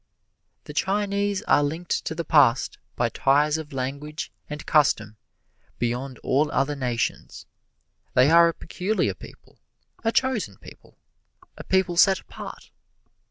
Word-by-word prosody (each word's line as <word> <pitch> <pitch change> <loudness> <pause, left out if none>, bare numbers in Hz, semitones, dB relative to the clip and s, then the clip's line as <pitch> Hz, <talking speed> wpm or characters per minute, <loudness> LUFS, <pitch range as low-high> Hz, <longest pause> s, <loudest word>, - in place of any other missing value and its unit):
The 150 - -9
Chinese 200 +3 0
are 145 - +4
linked 160 +4 -2
to 160 - -3
the 170 0 -4
past 135 -6 +3 0.2
by 120 -1 +1
ties 145 +5 +2
of 155 -2 -8
language 140 +4 -5 0.2
and 150 0 -7
custom 110 -8 +2 0.6
beyond 125 +2 -3
all 145 +3 +1
other 140 +2 0
nations. 125 -4 -3 0.7
They 130 +4 +5
are 170 0 +7
a 165 - 0
peculiar 190 +6 -1
people, - - -15 0.4
a 225 - +2
chosen 230 - 0
people, - - -16 0.6
a - - -9
people 190 -2 +1
set 190 +1 +5
apart. - - -10
150 Hz, 130 wpm, -24 LUFS, 135-180 Hz, 0.7 s, are